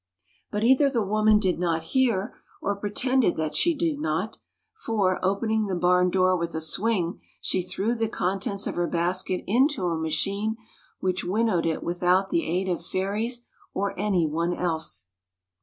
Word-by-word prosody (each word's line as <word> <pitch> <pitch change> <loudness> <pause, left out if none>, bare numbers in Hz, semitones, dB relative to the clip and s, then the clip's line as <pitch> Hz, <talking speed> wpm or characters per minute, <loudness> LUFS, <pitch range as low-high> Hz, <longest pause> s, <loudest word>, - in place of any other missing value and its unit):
But 210 +1 -2
either 265 +4 +5
the 235 -6 0
woman 215 +1 +4
did 185 -5 0
not 165 -2 0
hear 235 -7 +2 0.3
or 200 - -1
pretended 225 +3 +1
that 155 -1 -2
she 340 -1 +3
did 315 -2 -1
not; 315 - -2 0.4
for, 215 - 0
opening 215 +3 +1
the 190 - -1
barn 180 +1 +3
door 185 0 +3
with 170 -1 -3
a - - 0
swing, 180 +2 0 0.2
she 185 - 0
threw 195 +5 -1
the 225 -2 -1
contents 195 +1 -1
of - - -3
her 175 0 +1
basket 180 +1 0
into 250 - +2
a 165 - 0
machine, 195 +7 0 0.5
which 185 0 0
winnowed 195 -3 +1
it 160 - -1
with 175 +1 -4
out 185 +2 +3
the 170 - +1
aid 185 +3 0
of 175 -2 -2
fairies 215 +7 -2 0.3
or 200 +1 -1
any 190 -4 +1
one 165 +3 -1
else. 160 - -2
190 Hz, 170 wpm, -26 LUFS, 175-220 Hz, 0.5 s, either